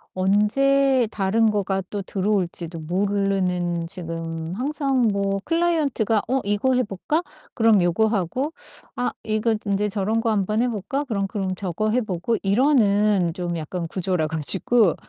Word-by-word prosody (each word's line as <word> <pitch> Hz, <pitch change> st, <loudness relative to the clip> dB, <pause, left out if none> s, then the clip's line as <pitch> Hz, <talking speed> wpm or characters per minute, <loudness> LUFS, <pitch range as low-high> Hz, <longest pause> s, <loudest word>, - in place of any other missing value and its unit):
언제 250 Hz, +7 st, +3 dB
다른 215 Hz, +2 st, +2 dB
거가 195 Hz, -2 st, -1 dB
또 205 Hz, -, -3 dB
들어올지도 185 Hz, -4 st, -2 dB
모르는 180 Hz, -1 st, 0 dB
지금 165 Hz, -2 st, -4 dB
항상 270 Hz, 0 st, 0 dB
뭐 195 Hz, 0 st, 0 dB
클라이언트가 305 Hz, -11 st, +1 dB
"어 260 Hz, +3 st, +1 dB
이거 205 Hz, +6 st, +1 dB
해 255 Hz, -, +2 dB
볼까?" 230 Hz, -, -2 dB, 0.3 s
그럼 225 Hz, -4 st, +4 dB
요거 175 Hz, +5 st, +2 dB
하고 220 Hz, -, -1 dB, 0.4 s
"아 245 Hz, -, -1 dB
이거 215 Hz, +1 st, 0 dB
인제 200 Hz, +1 st, 0 dB
저런 210 Hz, +3 st, 0 dB
거 225 Hz, -1 st, 0 dB
한번 210 Hz, +1 st, 0 dB
해 -, -, +1 dB
볼까?" 240 Hz, +7 st, -3 dB
그럼 200 Hz, -6 st, -1 dB
그럼 190 Hz, -2 st, -3 dB
저거 195 Hz, +3 st, -2 dB
해 250 Hz, +3 st, +2 dB
보고 200 Hz, +1 st, -2 dB
이러는 205 Hz, -, +3 dB
좀 175 Hz, -1 st, -3 dB
약간 165 Hz, +2 st, -4 dB
구조라 180 Hz, -3 st, -1 dB
가지고 170 Hz, +6 st, +2 dB
205 Hz, 285 characters per minute, -23 LUFS, 185-230 Hz, 0.4 s, 그럼